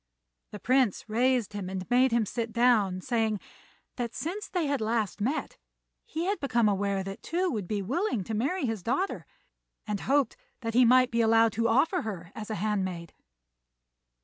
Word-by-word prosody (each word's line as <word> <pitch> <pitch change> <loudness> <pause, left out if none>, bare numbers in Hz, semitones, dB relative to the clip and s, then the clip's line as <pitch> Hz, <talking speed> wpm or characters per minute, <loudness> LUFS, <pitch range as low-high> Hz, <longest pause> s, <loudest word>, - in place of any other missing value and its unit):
The 210 - -8
Prince 255 -4 +1
raised 240 0 +1
him 200 -3 -4
and 190 -1 -5
made 255 +1 +4
him 230 -1 +2
sit 230 +2 -3
down, 220 -6 +3
saying 220 -2 0 0.6
that 235 -2 -3
since 400 +6 -4
they 355 -4 -1
had 280 -3 -1
last 220 -2 -1
met 265 +9 -2 0.5
he 325 +2 -3
had 400 +2 0
become 240 -5 +2
aware 200 -1 0
that 195 0 -7
Tou 360 +2 -1
would 210 -6 -3
be 205 0 -2
willing 260 - -1
to 220 - -5
marry 275 - 0
his 225 -4 -2
daughter, 270 - -2 0.6
and 210 -2 -2
hoped 280 +3 +1 0.3
that 225 -1 -3
he 250 +1 +6
might 255 +1 +5
be 235 0 +2
allowed 225 0 +4
to 230 +3 0
offer 275 +11 +2
her 180 -6 -6
as 215 0 -7
a 215 - -2
handmaid. 185 -4 -2
230 Hz, 175 wpm, -28 LUFS, 205-260 Hz, 0.6 s, he